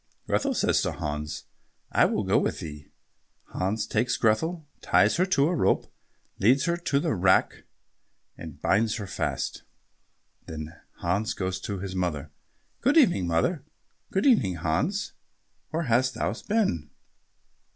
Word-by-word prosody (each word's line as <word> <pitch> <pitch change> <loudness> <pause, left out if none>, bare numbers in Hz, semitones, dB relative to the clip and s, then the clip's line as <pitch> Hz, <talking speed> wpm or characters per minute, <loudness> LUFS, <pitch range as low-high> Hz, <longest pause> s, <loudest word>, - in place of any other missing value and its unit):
Grethel - - 0
says - - +2
to - - -1
Hans, 75 0 -4 0.5
"I - - +5
will - - 0
go - - +3
with - - -1
thee." 75 -2 -8 0.6
Hans 100 +4 -1
takes 120 +3 0
Grethel, 155 +9 +1
ties - - +3
her 185 +2 +2
to 145 -6 +3
a 175 - 0
rope, 155 - +1 0.5
leads 125 +8 +4
her 170 - +1
to 170 -5 0
the 155 0 0
rack 95 -1 +2 0.7
and - - -10
binds 110 +1 +2
her 105 - -5
fast. 95 - -3 0.9
Then 80 0 -6 0.3
Hans 100 +5 0
goes 95 -1 -2
to 100 +1 -4
his 95 0 -5
mother. 80 -5 -2 0.5
"Good 280 +6 +3
evening, 175 - +4
mother." 85 - 0 0.5
"Good 195 - 0
evening, 115 - +4
Hans. 85 - -1 0.6
Where 165 +1 -2
hast 130 -1 +2
thou 110 - -1 0.2
been?" 195 - +1
105 Hz, 140 wpm, -27 LUFS, -, 0.9 s, I